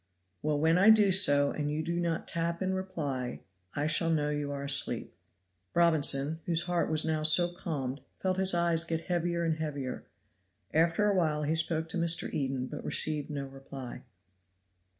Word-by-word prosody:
"Well, 150 Hz, -1 st, -1 dB
when 165 Hz, +3 st, +2 dB
I 200 Hz, +4 st, +6 dB
do 210 Hz, -3 st, +5 dB
so 145 Hz, -7 st, +5 dB
and 145 Hz, -1 st, -3 dB
you 155 Hz, +1 st, -3 dB
do 170 Hz, +2 st, -3 dB
not 170 Hz, -1 st, -3 dB
tap 170 Hz, 0 st, -2 dB
in 190 Hz, 0 st, -1 dB
reply 150 Hz, -10 st, -4 dB, 0.3 s
I 145 Hz, -, -1 dB
shall 155 Hz, +2 st, +1 dB
know 150 Hz, -2 st, 0 dB
you 145 Hz, -1 st, -3 dB
are 140 Hz, 0 st, -5 dB
asleep." 140 Hz, 0 st, +1 dB, 0.6 s
Robinson, 160 Hz, -3 st, +3 dB
whose 170 Hz, -1 st, 0 dB
heart 175 Hz, -1 st, -1 dB
was 155 Hz, -1 st, +2 dB
now 160 Hz, -1 st, -1 dB
so 160 Hz, +3 st, +4 dB
calmed, 145 Hz, -7 st, -5 dB
felt 185 Hz, -1 st, -2 dB
his 190 Hz, -1 st, +3 dB
eyes 170 Hz, -1 st, +3 dB
get 165 Hz, -1 st, -3 dB
heavier 170 Hz, -1 st, -2 dB
and 160 Hz, -1 st, -1 dB
heavier. 145 Hz, -5 st, -5 dB, 0.7 s
After 170 Hz, +6 st, +2 dB
a 205 Hz, -, +2 dB
while 155 Hz, -5 st, 0 dB
he 150 Hz, +2 st, 0 dB
spoke 160 Hz, 0 st, 0 dB
to -, -, -4 dB
Mr. 170 Hz, 0 st, +2 dB
Eden 135 Hz, -3 st, -2 dB
but -, -, -8 dB
received 155 Hz, -2 st, +1 dB
no 140 Hz, -2 st, -5 dB
reply. 135 Hz, -2 st, -10 dB
160 Hz, 175 wpm, -29 LUFS, 145-170 Hz, 0.7 s, I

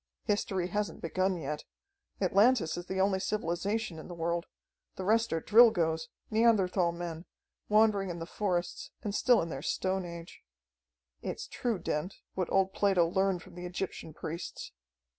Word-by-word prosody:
History 190 Hz, -4 st, 0 dB
hasn't 210 Hz, +2 st, -2 dB
begun 185 Hz, +3 st, 0 dB
yet. 150 Hz, -1 st, -4 dB, 0.6 s
Atlantis 200 Hz, -1 st, +4 dB
is 175 Hz, 0 st, -6 dB
the 190 Hz, 0 st, -2 dB
only 190 Hz, 0 st, +3 dB
civilization 195 Hz, 0 st, -1 dB
in -, -, -9 dB
the 175 Hz, -, -7 dB
world. 170 Hz, +1 st, -1 dB, 0.5 s
The 185 Hz, -, -5 dB
rest 225 Hz, +3 st, +3 dB
are 165 Hz, -, +1 dB
Drilgoes, 170 Hz, -8 st, +5 dB, 0.2 s
Neanderthal 200 Hz, -6 st, +3 dB
men, 170 Hz, 0 st, -6 dB, 0.4 s
wandering 210 Hz, -2 st, +4 dB
in 175 Hz, -, -4 dB
the 165 Hz, -, -5 dB
forests, 180 Hz, -1 st, -2 dB
and 205 Hz, -, -2 dB
still 240 Hz, 0 st, +4 dB
in 165 Hz, -, -5 dB
their 135 Hz, -3 st, -5 dB
stone 190 Hz, +4 st, -1 dB
age. 170 Hz, -1 st, -9 dB, 0.8 s
"It's -, -, -4 dB
true, 235 Hz, -4 st, -2 dB
Dent, 170 Hz, +2 st, -3 dB, 0.2 s
what 185 Hz, -2 st, -2 dB
old 190 Hz, 0 st, +3 dB
Plato 190 Hz, -4 st, +3 dB
learned 190 Hz, 0 st, +1 dB
from 185 Hz, -, -15 dB
the 180 Hz, 0 st, -6 dB
Egyptian 175 Hz, -2 st, -5 dB
priests. 165 Hz, +2 st, -6 dB
185 Hz, 155 wpm, -31 LUFS, 170-205 Hz, 0.8 s, Drilgoes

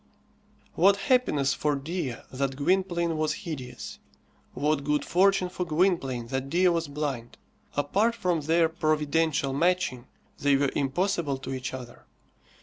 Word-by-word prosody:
What 195 Hz, +4 st, +5 dB
happiness 200 Hz, -, +2 dB
for 150 Hz, -1 st, 0 dB
Dea 145 Hz, -2 st, -3 dB, 0.2 s
that 135 Hz, 0 st, -2 dB
Gwynplaine 170 Hz, +1 st, +1 dB
was 155 Hz, 0 st, +1 dB
hideous! 135 Hz, -7 st, -6 dB, 0.6 s
What 150 Hz, -1 st, +1 dB
good 150 Hz, +1 st, 0 dB
fortune 190 Hz, +1 st, +3 dB
for 180 Hz, 0 st, -4 dB
Gwynplaine 155 Hz, -8 st, +1 dB
that 135 Hz, +1 st, -3 dB
Dea 180 Hz, +4 st, +4 dB
was 165 Hz, -2 st, 0 dB
blind! 140 Hz, -5 st, -4 dB, 0.4 s
Apart 205 Hz, +11 st, +2 dB
from 180 Hz, -7 st, 0 dB
their 165 Hz, +2 st, +3 dB
providential 155 Hz, -2 st, 0 dB
matching, 165 Hz, -5 st, 0 dB, 0.3 s
they 145 Hz, -1 st, +3 dB
were 140 Hz, 0 st, +1 dB
impossible 145 Hz, 0 st, 0 dB
to 135 Hz, 0 st, -6 dB
each 130 Hz, -1 st, -4 dB
other. 125 Hz, -2 st, -9 dB
155 Hz, 135 wpm, -27 LUFS, 135-175 Hz, 0.6 s, What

